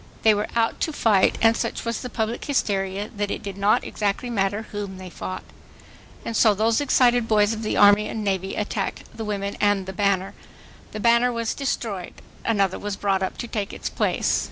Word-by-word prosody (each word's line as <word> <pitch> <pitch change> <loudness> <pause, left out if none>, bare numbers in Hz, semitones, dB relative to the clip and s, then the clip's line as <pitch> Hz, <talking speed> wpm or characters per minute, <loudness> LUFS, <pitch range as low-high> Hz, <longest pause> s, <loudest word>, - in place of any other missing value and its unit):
They 220 - +6
were 210 0 -1
out 230 -1 +1
to 315 - 0
fight 215 -9 +3
and 225 0 +6
such - - -3
was 230 -1 -2
the 250 - -5
public 225 0 -2
hysteria 200 -7 -1
that 205 0 -2
it - - -4
did 200 -2 -5
not 200 +2 +2
exactly 210 +4 -2
matter 200 0 0
whom 200 -2 -5
they 185 -1 -9
fought. 185 - -6 0.8
And 230 - -3
so 215 -2 +5
those 220 +5 +2
excited 245 -4 +3
boys 210 0 +3
of 220 - -5
the 215 - -1
Army 205 +1 +6
and 220 0 -4
Navy 190 -1 -1
attacked 210 -1 -3
the 225 - -5
women 200 -1 -3
and 205 -2 +2
the 190 - -6
banner. 195 0 0 0.6
The 215 - -6
banner 235 +2 +4
was 230 -1 -2
destroyed. 225 -9 -3 0.3
Another 200 -4 +1
was 205 -1 -3
brought 195 -2 0
up 190 - -3
to 240 - -5
take 210 -3 -3
its - - -5
place. - - +1
210 Hz, 200 wpm, -24 LUFS, 195-225 Hz, 0.8 s, They